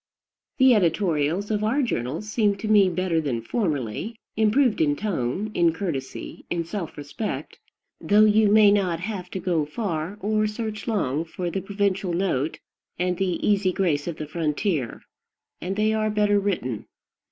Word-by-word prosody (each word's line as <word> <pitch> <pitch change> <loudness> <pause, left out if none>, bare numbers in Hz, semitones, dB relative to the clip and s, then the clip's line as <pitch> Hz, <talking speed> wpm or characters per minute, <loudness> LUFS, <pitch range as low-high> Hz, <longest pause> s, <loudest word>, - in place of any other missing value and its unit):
The 260 -2 +6
editorials 175 -1 +1
of 210 0 0
our 255 +7 +2
journals 155 - -2
seem 210 -2 +2
to 205 +2 -5
me 205 -3 +5
better 175 -2 0
than 135 -6 -2
formerly, 155 - -2 0.2
improved 220 +1 +3
in 145 -2 +3
tone, 190 - -2
in 170 -3 +3
courtesy, 160 -8 -5
in 170 -1 -1
self 170 -1 -5
respect, 145 +9 -5 0.4
though 210 +1 +5
you 215 0 +4
may 210 -1 +7
not 185 -5 +1
have 185 -2 -5
to 190 - -4
go 170 -4 0
far 165 +2 -3
or 215 +1 +1
search 215 0 -5
long 160 - 0
for 175 +1 -4
the 195 - -2
provincial 195 -2 -1
note 170 -5 0 0.4
and 180 0 0
the 185 -2 -1
easy 195 -2 +3
grace 170 -6 0
of 170 - -3
the 155 - -5
frontier, 150 - -2 0.6
and 185 +2 -3
they 215 +1 +2
are 215 0 +1
better 210 -1 +2
written. 150 - -2
190 Hz, 160 wpm, -24 LUFS, 160-210 Hz, 0.6 s, may